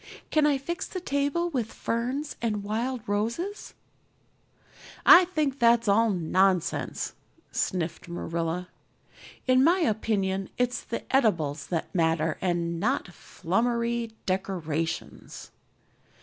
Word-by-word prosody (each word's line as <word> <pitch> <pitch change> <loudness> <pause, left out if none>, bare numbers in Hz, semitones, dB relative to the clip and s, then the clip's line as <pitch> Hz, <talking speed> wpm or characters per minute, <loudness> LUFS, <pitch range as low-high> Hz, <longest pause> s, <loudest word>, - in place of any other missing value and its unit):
"Can 305 -1 +4
I 285 -2 +3
fix 340 +7 -4
the 370 - -5
table 285 +2 0
with 240 -6 -2
ferns 255 +6 -2
and 210 -3 -1
wild 235 +4 -2
roses?" 235 - -2 1.3
"I 365 - +9
think 300 -6 -1
that's 235 -1 +4
all 225 +3 +4
nonsense," 185 -1 +1 0.4
sniffed 170 -3 -2
Marilla. 170 +1 -3 0.8
"In 255 0 +4
my 350 +5 +4
opinion 200 - 0
it's 250 0 0
the 230 - -5
eatables 160 - +1
that 165 -3 -3
matter 165 -3 +1
and 170 -2 -1
not 175 - 0
flummery 235 +6 -1
decorations." 170 -4 -3
220 Hz, 105 wpm, -27 LUFS, 175-260 Hz, 1.3 s, I